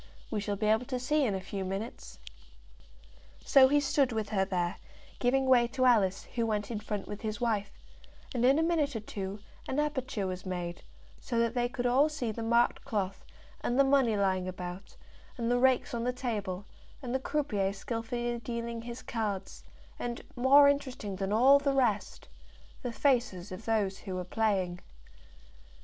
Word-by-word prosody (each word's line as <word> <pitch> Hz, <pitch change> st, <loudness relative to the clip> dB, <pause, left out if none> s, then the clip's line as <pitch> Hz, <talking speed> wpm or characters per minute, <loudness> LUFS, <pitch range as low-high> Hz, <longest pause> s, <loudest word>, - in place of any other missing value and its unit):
"We 215 Hz, -, 0 dB
shall 205 Hz, 0 st, -2 dB
be 215 Hz, +2 st, -2 dB
able 220 Hz, +3 st, +2 dB
to 255 Hz, -2 st, -2 dB
see 295 Hz, +3 st, +1 dB
in 205 Hz, -5 st, 0 dB
a -, -, -2 dB
few 195 Hz, +1 st, -5 dB
minutes." 195 Hz, +5 st, -6 dB, 1.3 s
So 270 Hz, -2 st, +7 dB
he 290 Hz, +2 st, +4 dB
stood 275 Hz, -2 st, +2 dB
with 220 Hz, -2 st, -2 dB
her 195 Hz, -3 st, +1 dB
there, 180 Hz, -2 st, -1 dB, 0.4 s
giving 265 Hz, +2 st, +2 dB
way 250 Hz, -2 st, +5 dB
to 255 Hz, +2 st, 0 dB
Alice, 200 Hz, -6 st, +3 dB
who 230 Hz, -2 st, 0 dB
went 210 Hz, 0 st, -1 dB
in 220 Hz, -, -2 dB
front 210 Hz, -2 st, -4 dB
with 205 Hz, -, -7 dB
his 215 Hz, -1 st, -3 dB
wife; 215 Hz, -4 st, 0 dB, 0.6 s
and 245 Hz, -2 st, 0 dB
in 265 Hz, +3 st, +5 dB
a 320 Hz, -, +3 dB
minute 315 Hz, -5 st, +1 dB
or -, -, -1 dB
two 200 Hz, -1 st, -6 dB, 0.3 s
an 265 Hz, -, -1 dB
aperture 260 Hz, -8 st, -1 dB
was 185 Hz, -1 st, -4 dB
made, 175 Hz, -2 st, -4 dB, 0.4 s
so 235 Hz, -, -3 dB
that 230 Hz, 0 st, +2 dB
they 245 Hz, -1 st, 0 dB
could 245 Hz, 0 st, -4 dB
all 265 Hz, +5 st, +4 dB
see 265 Hz, -7 st, -3 dB
the 230 Hz, -, -6 dB
marked 235 Hz, +1 st, +2 dB
cloth, 195 Hz, -3 st, -3 dB, 0.4 s
and 240 Hz, -, 0 dB
the 275 Hz, -, +7 dB
money 270 Hz, -5 st, +3 dB
lying 190 Hz, -2 st, +1 dB
about, 180 Hz, +1 st, -7 dB, 0.4 s
and 235 Hz, -1 st, -1 dB
the 245 Hz, -, +3 dB
rakes 260 Hz, -1 st, +3 dB
on 235 Hz, -1 st, -2 dB
the 250 Hz, -, +1 dB
table, 210 Hz, -7 st, -3 dB, 0.4 s
and 245 Hz, -1 st, -4 dB
the 265 Hz, -, +1 dB
croupier 220 Hz, -9 st, 0 dB
skilfully 235 Hz, +3 st, -3 dB
dealing 235 Hz, 0 st, -4 dB
his 235 Hz, +1 st, -8 dB
cards, 210 Hz, -5 st, -4 dB, 0.4 s
and, 240 Hz, 0 st, -4 dB
more 275 Hz, +3 st, +7 dB
interesting 260 Hz, -8 st, -1 dB
than 195 Hz, 0 st, -2 dB
all 260 Hz, +6 st, +6 dB
the 280 Hz, -1 st, 0 dB
rest, 230 Hz, -6 st, 0 dB, 0.5 s
the 245 Hz, -, -3 dB
faces 235 Hz, -9 st, +1 dB
of 185 Hz, +4 st, -8 dB
those 205 Hz, -4 st, 0 dB
who 190 Hz, -3 st, -6 dB
were 180 Hz, -, -2 dB
playing. 190 Hz, -3 st, 0 dB
230 Hz, 180 wpm, -30 LUFS, 200-255 Hz, 1.3 s, So